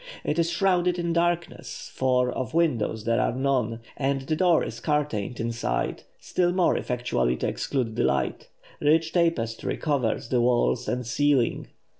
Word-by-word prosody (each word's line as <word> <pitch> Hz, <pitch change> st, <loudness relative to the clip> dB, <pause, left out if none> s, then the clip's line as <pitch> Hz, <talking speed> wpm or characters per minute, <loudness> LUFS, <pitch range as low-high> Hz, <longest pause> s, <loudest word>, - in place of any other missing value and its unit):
It 155 Hz, -, -1 dB
is 165 Hz, 0 st, +2 dB
shrouded 180 Hz, 0 st, +2 dB
in 170 Hz, -1 st, -1 dB
darkness, 170 Hz, 0 st, -2 dB
for 125 Hz, -1 st, +2 dB
of 130 Hz, +3 st, -4 dB
windows 120 Hz, -10 st, +1 dB
there 115 Hz, +1 st, +1 dB
are -, -, 0 dB
none, 125 Hz, -4 st, 0 dB
and 135 Hz, 0 st, 0 dB
the 145 Hz, +4 st, -1 dB
door 175 Hz, -1 st, +3 dB
is 115 Hz, -, -6 dB
curtained 145 Hz, -7 st, -1 dB
inside, 115 Hz, -, -2 dB, 0.2 s
still 175 Hz, -1 st, 0 dB
more 180 Hz, -1 st, +2 dB
effectually 120 Hz, -, -1 dB
to -, -, -1 dB
exclude 115 Hz, 0 st, -2 dB
the -, -, +1 dB
light. -, -, -1 dB, 0.3 s
Rich 160 Hz, +2 st, +2 dB
tapestry 165 Hz, -11 st, 0 dB
covers 130 Hz, -6 st, -1 dB
the 125 Hz, -2 st, +2 dB
walls 120 Hz, 0 st, +2 dB
and 125 Hz, 0 st, -2 dB
ceiling. 130 Hz, +1 st, +1 dB
135 Hz, 155 wpm, -26 LUFS, 115-165 Hz, 0.3 s, door